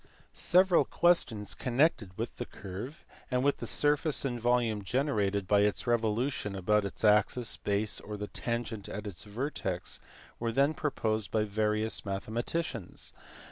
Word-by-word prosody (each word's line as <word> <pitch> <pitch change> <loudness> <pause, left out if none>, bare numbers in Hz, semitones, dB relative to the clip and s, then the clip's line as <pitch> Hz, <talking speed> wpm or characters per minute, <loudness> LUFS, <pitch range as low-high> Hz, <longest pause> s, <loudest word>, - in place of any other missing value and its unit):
Several 185 0 +4
questions 110 - +2
connected 120 - +1
with - - -4
the - - -4
curve, 105 - -8 0.2
and 125 0 +1
with 140 0 +2
the - - -6
surface 150 0 +2
and 120 -3 -2
volume 120 -3 +1
generated 100 -5 0
by 100 +1 +4
its 105 0 +2
revolution 115 -1 0
about 105 +2 +2
its 100 - -6
axis, 105 +3 +3
base, 105 +1 0
or 105 0 -7
the 105 - -4
tangent 115 -2 -4
at 105 +1 -5
its 100 -2 -7
vertex 105 -5 -3 0.4
were 115 0 -1
then 140 +6 +3
proposed 110 -9 -1
by 110 -1 +1
various 105 +1 0
mathematicians. 110 +11 -3
110 Hz, 140 wpm, -31 LUFS, 105-130 Hz, 0.4 s, Several